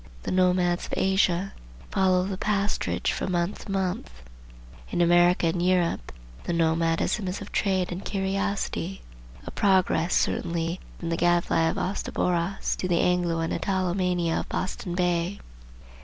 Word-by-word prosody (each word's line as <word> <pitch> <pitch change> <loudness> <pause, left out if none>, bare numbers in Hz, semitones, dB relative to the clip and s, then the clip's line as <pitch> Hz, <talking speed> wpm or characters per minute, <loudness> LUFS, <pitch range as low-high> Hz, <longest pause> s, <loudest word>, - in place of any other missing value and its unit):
The - - -3
nomads 180 -1 +2
of - - -4
Asia 190 -1 +2 0.4
follow 185 -2 +3
the 195 0 -3
pasturage 200 +1 0
from 185 - -2
month 175 +3 -1
to - - -6
month. 190 - -1 0.8
In 175 - -2
America 175 +1 +4
and 170 +1 0
Europe 180 -2 +1 0.3
the 175 - -1
nomadism 165 +4 +1
is 180 - -3
of 200 - -9
trade 190 -3 0
and 180 +2 -5
curiosity; 195 -1 -2 0.4
a - - -6
progress, 185 -3 +2
certainly, 170 +1 0 0.2
from 170 - -5
the 165 - 0
gad 175 0 +3
fly 165 0 +2
of - - -3
Astaboras 180 -1 -1
to 185 - -2
the 175 -2 +2
Anglo 175 -2 +1
and 165 - -1
Italo 185 -2 0
mania 180 -3 0
of - - -6
Boston 185 -1 -3
Bay. 180 +1 0
180 Hz, 150 wpm, -26 LUFS, 170-190 Hz, 0.8 s, America